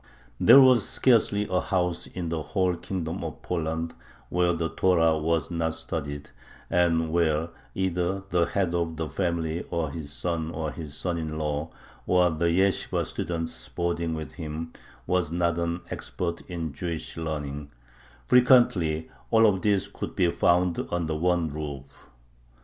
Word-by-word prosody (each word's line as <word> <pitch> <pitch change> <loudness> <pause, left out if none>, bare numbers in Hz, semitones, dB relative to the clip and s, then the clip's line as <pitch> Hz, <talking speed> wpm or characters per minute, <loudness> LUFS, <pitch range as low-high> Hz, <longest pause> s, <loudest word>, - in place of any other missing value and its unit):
There 135 - +9
was 130 -5 +6
scarcely 105 -4 +3
a 90 0 +1
house 90 -2 -1
in 90 -3 -5
the 80 -1 -2
whole 90 +2 0
Kingdom 85 -3 -4
of - - -6
Poland 80 -1 -2 0.4
where 90 0 +2
the 85 -1 -1
Torah 80 -1 +3
was 80 +1 0
not 80 -1 -1
studied, 75 -3 -5 0.4
and 85 -2 +2
where 80 -1 +1 0.3
either 95 0 -1
the 85 -1 +3
head 95 -3 0
of 85 -2 -1
the 80 -1 -2
family 85 +1 -1
or 80 -4 -1
his 75 -2 -7
son 80 +4 -2
or 80 -2 -3
his 75 -3 -7
son 85 0 -2
in 80 -1 -4
law, 75 0 -2 0.4
or 90 -1 +4
the 80 +2 0
yeshibah 95 +3 +1
student 80 -6 -4
boarding 85 -1 -1
with 80 -1 -6
him, 80 -1 -6 0.3
was 90 -3 0
not 85 0 +1
an 85 +1 -1
expert 85 -2 -3
in 85 -4 -4
Jewish 80 +2 -4
learning; 75 -3 -4 0.6
frequently 115 - +4 0.2
all 115 0 +5
of 95 -4 +3
these 100 -1 +2
could 100 - -6
be 90 -3 +3
found 90 0 +2
under 85 -2 -1
one 85 +1 +1
roof. 70 -2 -8
85 Hz, 150 wpm, -27 LUFS, 80-90 Hz, 0.6 s, There